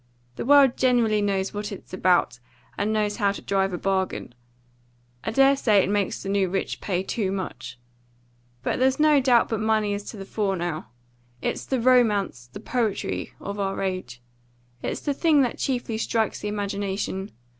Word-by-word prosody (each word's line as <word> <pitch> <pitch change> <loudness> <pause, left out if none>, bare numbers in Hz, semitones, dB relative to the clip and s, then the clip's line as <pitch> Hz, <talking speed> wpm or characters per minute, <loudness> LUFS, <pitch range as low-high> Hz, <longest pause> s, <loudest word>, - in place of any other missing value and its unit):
The - - -4
world 275 -2 +6
generally 235 -5 +3
knows 195 -1 -1
what 205 0 -4
it's 195 - -10
about, 180 -8 +2 0.4
and 205 +2 -1
knows 210 -1 0
how 200 -3 +2
to - - -7
drive 195 -1 +1
a 175 - -3
bargain. 190 -8 -2 0.9
I - - -2
dare 270 +4 +5
say 220 -6 +3
it 195 - -1
makes 205 -2 -1
the - - -6
new 195 -2 +1
rich 190 +2 -3
pay 185 -2 -1
too 195 -1 -2
much. 185 -12 -5 0.9
But - - -1
there's 260 +3 +2
no 305 -1 +5
doubt 250 -3 +4
but 225 - -1
money 215 -1 +1
is 200 0 -4
to 220 - -8
the 195 - -7
fore 200 -1 -1
now. 170 -7 -3 0.6
It - - +1
is - - -9
the 265 - 0
romance, 215 - +2
the - - -8
poetry 230 -5 -2
of 200 +1 -6
our 195 -1 -1
age. 185 -11 -4 0.6
It's - - -3
the 290 - -1
thing 300 -1 +4
that 245 - -2
chiefly 245 -4 -2
strikes 225 -1 0
the - - -4
imagination. 200 -1 -3
205 Hz, 180 wpm, -25 LUFS, 195-235 Hz, 0.9 s, world